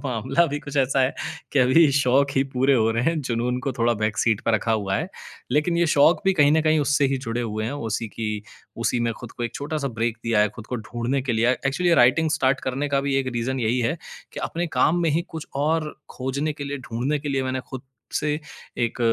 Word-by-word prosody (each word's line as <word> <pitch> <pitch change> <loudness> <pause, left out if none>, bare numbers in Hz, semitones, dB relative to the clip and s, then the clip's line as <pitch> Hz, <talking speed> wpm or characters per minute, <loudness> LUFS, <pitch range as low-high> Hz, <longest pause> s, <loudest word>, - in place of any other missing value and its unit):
मामला 130 +5 +1
भी 145 -1 -3
कुछ 145 0 -7
ऐसा 135 0 +2
है 130 - +1 0.4
कि 145 - +2
अभी 135 +5 +5
शौक 140 +1 +3
ही 135 - +5
पूरे 135 +2 +3
हो 115 -2 +3
रहे 115 +1 0
हैं, 165 0 +1
जुनून 125 -1 -1
को 135 +1 -2
थोड़ा 120 -1 +1
बैक 110 -1 0
सीट 110 -3 +2
पर 115 - +2
रखा 110 +1 +1
हुआ 100 -3 0
है। 160 - -3 0.4
लेकिन 150 +5 +2
ये 170 - +3
शौक़ 160 +4 +4
भी 195 - +4
कहीं 145 -5 +4
न 160 0 +3
कहीं 155 0 +3
उससे 145 0 +2
ही - - +1
जुड़े 120 -2 -3
हुए 110 -2 -3
हैं, 115 - -3
उसी 115 -5 -3
की 110 +1 -5 0.6
उसी 120 - +1
में 115 - 0
खुद - - -9
को - - -7
एक 115 - -5
छोटा-सा 145 -1 -3
ब्रेक 115 0 0
दिया 115 -2 +2
है 105 - +4
खुद 110 +2 -11
को 125 - -3
ढूँढ़ने 120 +4 -2
के 130 -2 -1
लिए। 115 +1 +2
अ, 125 0 +3
एक्चुअली 150 +6 0
ये 170 - +5
राइटिंग 155 +6 +4
स्टार्ट 135 -3 +1
करने 135 +3 -2
का 140 -1 +1
भी 140 - +1
एक 135 -1 0
रीज़न 125 +2 -2
यही 120 +2 +1
है 150 +9 0 0.4
कि - - -6
अपने 175 +1 -2
काम 175 +2 +3
में 165 - +2
ही 160 +3 +1
कुछ 160 -2 -7 0.2
और 155 0 0 0.2
खोजने 140 +4 -2
के 145 -1 -7
लिए, 140 0 -4
ढूँढ़ने 130 +4 -2
के 145 - -6
लिए, 135 -1 0
मैंने 130 0 -2
खुद 130 -2 -6 0.3
से 150 -1 0 0.5
एक 115 - -4
130 Hz, 250 wpm, -24 LUFS, 115-145 Hz, 0.6 s, अभी